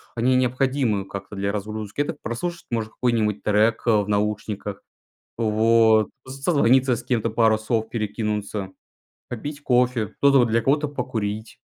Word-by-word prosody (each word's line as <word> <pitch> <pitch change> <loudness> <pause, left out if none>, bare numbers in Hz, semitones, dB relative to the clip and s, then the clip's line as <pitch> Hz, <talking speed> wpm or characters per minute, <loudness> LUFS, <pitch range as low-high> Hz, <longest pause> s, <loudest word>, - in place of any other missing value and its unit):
они 125 +2 +2
необходимы 130 -5 +1
как-то 100 +1 -8
для 100 +1 -1
разгрузки. 105 +2 -5
Это 145 - -2
прослушать 170 +9 -4
можно 110 -2 -2
какой-нибудь 110 -4 0
трек, 110 +2 +2
э, - - +5
в 100 - -6
наушниках. 105 -1 -2 0.6
Вот, 110 0 +3 0.2
с 135 +1 -9
созвониться 130 -5 +3
с 120 - -7
кем-то, 115 -2 0
пару 110 0 +3
слов 110 0 -2
перекинуться, 105 -3 -3 0.6
попить 145 +5 -6
кофе. 125 -4 +2
Кто-то, 140 -1 +5
вот, 120 - +3
для 115 +1 +2
кого-то- 145 +5 +1
покурить. 110 -6 -4
115 Hz, 145 wpm, -23 LUFS, 105-125 Hz, 0.6 s, э